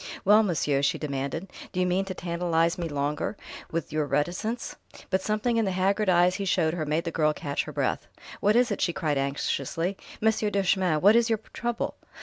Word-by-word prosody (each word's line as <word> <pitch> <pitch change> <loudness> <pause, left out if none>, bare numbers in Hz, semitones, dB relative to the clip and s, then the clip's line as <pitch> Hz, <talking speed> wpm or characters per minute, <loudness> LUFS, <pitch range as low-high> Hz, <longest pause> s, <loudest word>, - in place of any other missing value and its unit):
"Well, 210 +3 +7
monsieur?" 150 -8 +1
she 140 - +1
demanded. 140 +5 -4 0.2
"Do 185 - -3
you 180 - +3
mean 180 +2 +1
to 190 -1 -5
tantalize 170 -1 0
me 170 -2 -4
longer 145 +6 -2 0.3
with 165 -2 -3
your 155 -1 0
reticence?" 180 +11 -2 0.4
But 190 0 +2
something 215 +4 0
in 225 - +2
the - - 0
haggard 195 +2 +1
eyes 180 0 +4
he 200 - -3
showed 165 -4 +2
her 160 -3 -3
made 155 +3 0
the 165 - -3
girl 155 -1 +2
catch 140 -1 -3
her - - -7
breath. - - -1 0.3
"What 210 +2 +3
is 245 -1 +3
it?" 200 - -2
she 170 - +1
cried 150 -4 0
anxiously. 140 +6 -2 0.2
"Monsieur 220 -1 +2
Duchemin, 190 -5 +1
what 205 +4 +6
is 235 0 +4
your 225 - +2 0.2
trouble?" 240 -1 -3
180 Hz, 200 wpm, -27 LUFS, 155-200 Hz, 0.4 s, Well